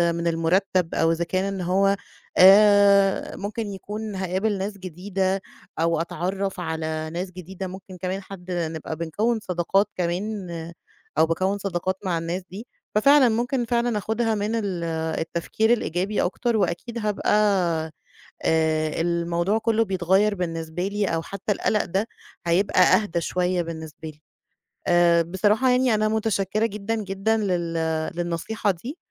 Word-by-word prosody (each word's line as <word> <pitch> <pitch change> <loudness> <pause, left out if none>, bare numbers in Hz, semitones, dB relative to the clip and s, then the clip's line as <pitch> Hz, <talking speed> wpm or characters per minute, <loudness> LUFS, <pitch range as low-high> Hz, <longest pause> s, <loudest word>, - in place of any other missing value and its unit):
من 170 0 -2
المرتب 170 +2 +1
أو 165 - +3
إذا 165 +1 0
كان 185 +2 -1
إن 190 - -4
هو 195 +3 +2 0.4
آآ، 200 0 +6
ممكن 210 +2 -4
يكون 210 +2 -6
هاقابل 190 +3 -1
ناس 200 +2 -4
جديدة 190 +1 -2 0.4
أو 165 0 +2
أتعرّف 190 +3 -3
على 160 -2 -3
ناس 180 +2 -4
جديدة 185 +1 -7
ممكن 185 0 -10
كمان 190 +1 -2
حد 185 -2 -10
نبقى 160 -2 -3
بنكوّن 205 +9 -1
صداقات 190 +1 +1
كمان 185 +2 -2 0.7
أو 160 - +6
باكوّن 185 +5 0
صداقات 185 -1 -2
مع 175 -3 0
الناس 165 +3 -3
دي، 210 +6 -8 0.3
ففعلًا 275 +4 +6
ممكن 240 +2 0
فعلًا 235 -1 0
آخُدها 220 +2 0
من 210 +2 -1
ال 195 -6 -2 0.4
التفكير 170 +7 0
الإيجابي 195 -2 -1
أكتر، 235 +5 0
وأكيد 200 +5 -2
هابقى 210 -3 -1 1.1
آآ، 155 -1 +1
الموضوع 170 +3 0
كله 225 0 +2
بيتغير 190 +2 +2
بالنسبة 165 0 -3
لي 205 +1 -1
أو 165 -3 -1
حتى 200 +4 -4
القلق 210 +1 +1
ده 195 +5 -1 0.4
هيبقى 180 +2 +3
أهدى 180 -3 +3
شوية 180 +1 0
بالنسبة 160 -1 -7
لي. 150 0 -15 0.7
آآ، 175 -1 +5
بصراحة 205 +9 +2
يعني 250 -2 +3
أنا 215 0 +2
متشكرة 215 -1 0
جدًا 210 +1 -2
جدًا 210 +1 0
لل 180 -5 -1 0.4
للنصيحة 175 +5 -1
دي 235 - -8
190 Hz, 140 wpm, -24 LUFS, 170-210 Hz, 1.1 s, آآ